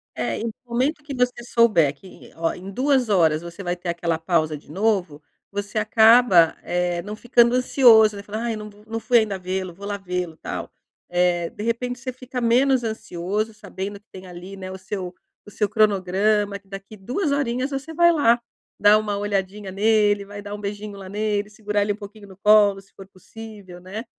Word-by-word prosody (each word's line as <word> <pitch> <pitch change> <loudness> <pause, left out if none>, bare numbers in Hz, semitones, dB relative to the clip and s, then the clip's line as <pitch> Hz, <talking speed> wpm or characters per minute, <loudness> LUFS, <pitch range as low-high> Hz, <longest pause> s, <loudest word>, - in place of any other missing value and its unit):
É, - - -2
e - - -4
no 230 - -3
momento 260 +6 -1
que 285 -1 -7
você 250 -1 0
souber 210 - +3
que 185 +6 -15
oh, 165 0 0
em 185 +2 -9
2 260 +2 +1
horas 165 -6 +3
você 170 +3 -9
vai 175 -1 -2
ter 175 0 -8
aquela 170 -1 -1
pausa 160 -2 0
de 145 - -16
novo, 185 -5 0 0.3
você 200 +1 -4
acaba, 220 -5 +5
eh, 175 -1 -1
não 210 +3 -7
ficando 240 +1 +3
ansioso, 240 -4 +6
você 205 - -11
vai 200 - -7
falar: 215 +2 -5
"Ai 230 -2 -1
não 210 0 -7 0.2
não 225 +1 -4
fui 245 +1 +4
ainda 210 -3 -1
vê-lo, 185 0 -4
vou 200 +4 -10
lá 205 0 -2
vê-lo, 180 -4 -4
tal", - - -6 0.4
eh, 175 -1 +1
de 210 - -8
repente 245 +2 -2
você 255 0 -5
fica 255 0 -6
menos 245 +2 +3
ansioso 210 0 -3
sabendo 200 -1 -7
que 210 - -45
tem 190 0 -10
ali, 180 +2 -10
né, 185 -1 -7
o 190 - -7
seu 185 -1 -6 0.3
o - - -11
seu 210 0 -1
cronograma 205 0 +1
que 200 -1 -30
daqui 195 +2 -9
2 270 - -2
horinhas 260 -1 -1
você 280 +4 -5
vai 345 +1 +5
lá, 240 -7 +4 0.4
dá 210 +1 +6
uma 210 -1 -2
olhadinha 200 0 -3
nele 205 0 +2
vai 205 0 -9
dar 205 0 -8
um 210 - -7
beijinho 205 0 -6
lá 190 - -9
nele, 210 +1 -1
segurar 210 -1 -2
ele 205 0 +1
um - - -10
pouquinho 205 0 -11
no 190 - -14
colo 205 -1 +5
se 195 - -25
for 195 - -12
possível, 195 -1 -12
né. 195 +6 -7
205 Hz, 205 wpm, -23 LUFS, 185-225 Hz, 0.4 s, ansioso